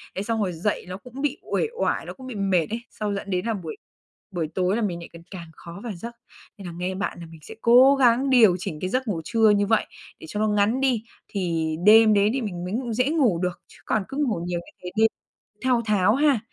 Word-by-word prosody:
Đấy 195 - -2
xong 225 0 -1
rồi 180 -2 -2
dậy 185 +5 -2
nó 185 +1 -6
cũng 250 +5 -10
bị 295 - -1
uể 455 - +1
oải, - - 0
nó - - -7
cũng 260 -1 -12
bị 245 - -6
mệt 190 -5 +1
ấy, 230 +2 -4
xong 210 -2 -3
dẫn 195 0 -6
đến 180 +2 -1
là 230 - 0
buổi 170 -6 -6 0.6
buổi 170 -4 -2
tối 185 +1 +1
là 235 - -1
mình 175 -5 -2
lại 170 - -10
cần 170 0 -12
càng 170 -3 -8
khó 170 +3 -10
vào 235 - -4
giấc. 235 +7 -8 0.4
Nên 195 -3 -9
là 170 - -7
nghe 185 +1 -3
bạn 195 -2 -3
là - - -7
mình 165 -1 -13
sẽ 220 - -10
cố 255 +4 +7
gắng 260 +1 +3
điều 225 -8 +6
chỉnh 155 -4 -5
cái 185 - -2
giấc 255 +3 -1
ngủ 170 -6 -2
trưa 225 -2 +3
như 205 -1 +3
vậy, 225 0 +2 0.3
để 160 - -11
cho 210 - -4
nó 215 - +2
ngắn 210 +5 +1
đi, 250 -5 +1 0.2
thì 165 -5 -2
đêm 220 0 +7
đấy 205 +1 +4
thì 270 - -1
mình 180 -5 -4
mới 180 +3 -4
ngủ 240 -1 -2
dễ 250 +5 +1
ngủ 255 - +2
được, 180 -1 -3
chứ - - -18
còn 215 - 0
cứ 270 - -6
ngủ 250 - 0
nhiều 175 -1 -2
như 175 - -14
thế 180 - -4
nên 220 0 +6 0.5
thao 250 -2 +2
tháo 210 +1 +3
ha, 285 -5 +3
210 Hz, 260 wpm, -24 LUFS, 180-235 Hz, 0.6 s, cố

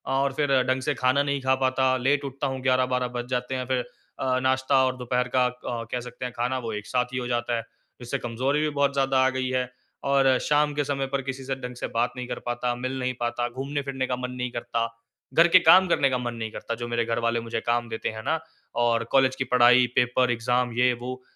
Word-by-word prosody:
और 135 0 +1
फिर 145 0 0
ढंग 130 +1 0
से 145 +3 0
खाना 130 +2 +2
नहीं 140 -1 -1
खा 130 0 +2
पाता, 130 0 +2
लेट 140 +3 +1
उठता 135 +1 -3
हूँ, 130 0 -3
11-12 130 -1 +2
बज 120 0 -3
जाते 125 +1 -2
हैं। 130 -1 -3
फिर 125 -1 0 0.3
अ, 130 -1 +1
नाश्ता 130 +1 +2
और 130 0 -1
दोपहर 125 0 -1
का 125 -1 +4 0.2
क 115 -1 -4
कह 125 - -1
सकते 125 +1 -7
हैं 125 - -4
खाना 125 +2 0
वो 115 -2 -5
एक 105 0 -5
साथ 125 -1 +1
ही - - -2
हो 125 - -2
जाता 120 0 -1
है। 115 - -4 0.4
इससे 120 +3 -2
कमज़ोरी 130 +4 -1
भी 155 - +1
बहुत 140 -1 +1
ज़्यादा 135 -1 +1
आ - - +4
गई 130 -1 -2
है। 125 -1 -1 0.4
और 135 -2 +4
शाम 150 0 +2
के 145 0 0
समय 135 -1 -1
पर 135 0 -2
किसी 135 0 -4
से 135 0 -2
ढंग 125 -1 -7
से - - -4
बात 120 +1 +1
नहीं 125 - -4
कर - - -4
पाता, 120 0 -1
मिल 130 +2 -4
नहीं 125 0 -1
पाता। 120 0 -1
घूमने 135 +4 -3
फिरने 135 -2 -3
का 125 - -1
मन 125 0 -5
नहीं 125 -1 -4
करता। 115 -1 -2 0.5
घर 170 +1 +6
के 185 +2 +7
काम 180 +3 +7
करने 140 -5 +3
का 130 - 0
मन 120 -1 -3
नहीं 110 -1 -5
करता, 115 - -5
जो 120 +1 -5
मेरे 120 -1 0
घर 115 0 -1
वाले 115 0 +1
मुझे 115 0 -3
काम 120 0 0
देते 110 - -3
हैं 110 0 -7
ना। 160 - +1 0.4
और 115 -1 +2
कॉलेज 135 -1 +4
की 130 - -1
पढ़ाई, 125 0 +6
पेपर, 125 0 +3
एग्ज़ाम 125 +1 0
ये 125 0 +4
वो, 130 +1 -6
125 Hz, 245 wpm, -25 LUFS, 120-135 Hz, 0.5 s, के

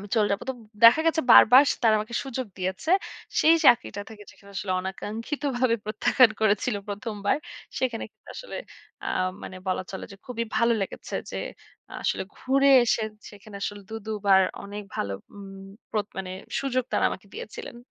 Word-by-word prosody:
আমি 205 - -8
চলে 210 -2 +3
যাবো। 200 - -2
তো 265 - -4 0.3
দেখা 235 +7 +9
গেছে 320 0 +3
বারবার 255 +5 +9 0.2
তারা 220 - +6
আমাকে 220 +3 -7
সুযোগ 260 -1 -4
দিয়েছে। 190 - -3 0.5
সেই 325 +1 +6
চাকরিটা 225 -4 +4
থেকে 215 -2 -11
যেখানে 200 - -18
আসলে 190 -2 -2
অনাকাঙ্ক্ষিতভাবে 230 +6 -2
প্রত্যাখ্যান 225 +3 +4
করেছিল 215 +2 +2
১ম 210 +2 -4
বার। - - +4 0.4
সেখানে 250 -3 -1
কিন্তু - - -25
আসলে - - -7 0.5
আ - - -3 0.4
মানে 185 - -8
বলা 185 - 0
চলে 190 - -6
যে - - -11
খুবই 230 -2 -3
ভালো 235 0 +4
লেগেছে। - - -6 0.2
যে - - -4 0.6
আসলে - - 0
ঘুরে 275 +2 +2 0.2
এসে 225 - +1 0.3
সেখানে 205 0 -14
আসলে 205 0 -4
২ 225 - -4
২ 220 - -2
বার 190 -1 +7 0.2
অনেক 205 +1 -7
ভালো 100 -1 -2 0.8
প্র - - -4 0.2
মানে 185 -1 -4 0.3
সুযোগ 255 -2 0
তারা - - +2
আমাকে 195 - -7
দিয়েছিলেন। 230 +2 -8
220 Hz, 165 wpm, -26 LUFS, 205-255 Hz, 0.8 s, দেখা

